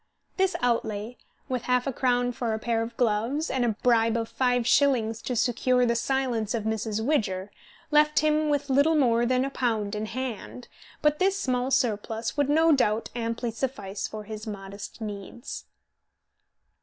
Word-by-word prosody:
This 380 Hz, 0 st, +1 dB
outlay, 230 Hz, -2 st, -1 dB, 0.3 s
with 255 Hz, -2 st, -2 dB
half 250 Hz, 0 st, +3 dB
a 275 Hz, -, -2 dB
crown 245 Hz, -1 st, +1 dB
for 235 Hz, -2 st, -2 dB
a -, -, -2 dB
pair 225 Hz, 0 st, -1 dB
of 230 Hz, +1 st, -5 dB
gloves, 240 Hz, +7 st, 0 dB
and 260 Hz, -2 st, 0 dB
a 230 Hz, -3 st, +1 dB
bribe 230 Hz, -2 st, +3 dB
of 225 Hz, -1 st, -3 dB
five 245 Hz, -2 st, +1 dB
shillings 235 Hz, -5 st, +3 dB
to 250 Hz, -, -3 dB
secure 250 Hz, +2 st, +2 dB
the 235 Hz, 0 st, +1 dB
silence 240 Hz, -3 st, 0 dB
of 225 Hz, -, -2 dB
Mrs. 220 Hz, 0 st, -2 dB
Widger, 205 Hz, -9 st, 0 dB, 0.4 s
left 300 Hz, 0 st, +4 dB
him 305 Hz, 0 st, +2 dB
with 290 Hz, -1 st, 0 dB
little 285 Hz, +4 st, +4 dB
more 240 Hz, -5 st, +3 dB
than 255 Hz, +1 st, +2 dB
a 275 Hz, -, -4 dB
pound 220 Hz, -6 st, -1 dB
in 215 Hz, +1 st, -3 dB
hand, 250 Hz, 0 st, -5 dB, 0.4 s
but 300 Hz, 0 st, +3 dB
this 390 Hz, +1 st, +2 dB
small 255 Hz, -4 st, 0 dB
surplus 225 Hz, -3 st, 0 dB
would 285 Hz, -1 st, +1 dB
no 320 Hz, +2 st, +4 dB
doubt 225 Hz, -6 st, +2 dB
amply 230 Hz, 0 st, -2 dB
suffice 210 Hz, -5 st, -4 dB
for 215 Hz, -1 st, -7 dB
his 215 Hz, +1 st, -8 dB
modest 200 Hz, +1 st, -8 dB
needs. 210 Hz, +3 st, -7 dB
240 Hz, 170 wpm, -27 LUFS, 220-265 Hz, 0.4 s, left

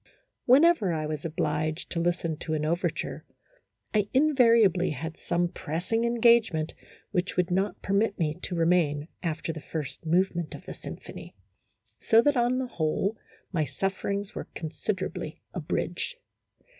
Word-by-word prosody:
" -, -, -52 dB
Whenever 265 Hz, -, +6 dB
I 155 Hz, -1 st, -1 dB
was 150 Hz, -1 st, -4 dB
obliged 155 Hz, 0 st, -1 dB
to 170 Hz, -, -1 dB
listen 170 Hz, -1 st, 0 dB
to 155 Hz, 0 st, -3 dB
an 150 Hz, 0 st, -1 dB
overture, 170 Hz, +3 st, -1 dB, 0.7 s
I 210 Hz, -1 st, +2 dB
invariably 230 Hz, -, +5 dB
had 160 Hz, +4 st, -5 dB
some 175 Hz, +1 st, 0 dB
pressing 175 Hz, +9 st, -2 dB
en 235 Hz, 0 st, -1 dB
gagement 225 Hz, -10 st, +4 dB, 0.4 s
which 185 Hz, -2 st, -1 dB
would 180 Hz, 0 st, +1 dB
not 195 Hz, +3 st, 0 dB
permit 200 Hz, +1 st, +1 dB
me 155 Hz, -4 st, 0 dB
to 180 Hz, -, -3 dB
remain 165 Hz, -3 st, +2 dB
after 165 Hz, -1 st, -2 dB
the 160 Hz, -, -7 dB
first 150 Hz, 0 st, -5 dB
movement 170 Hz, -1 st, +1 dB
of -, -, -12 dB
the -, -, -6 dB
symphony, -, -, -9 dB, 0.6 s
so 225 Hz, -, +5 dB
that, 290 Hz, -1 st, +3 dB
on 245 Hz, +1 st, +2 dB
the 260 Hz, -, 0 dB
whole, 190 Hz, +1 st, -1 dB, 0.4 s
my 165 Hz, -5 st, +1 dB
sufferings 195 Hz, +7 st, -2 dB
were -, -, -6 dB
considerably 180 Hz, 0 st, -4 dB
abridged. 175 Hz, -, -2 dB
175 Hz, 145 wpm, -28 LUFS, 160-210 Hz, 0.7 s, Whenever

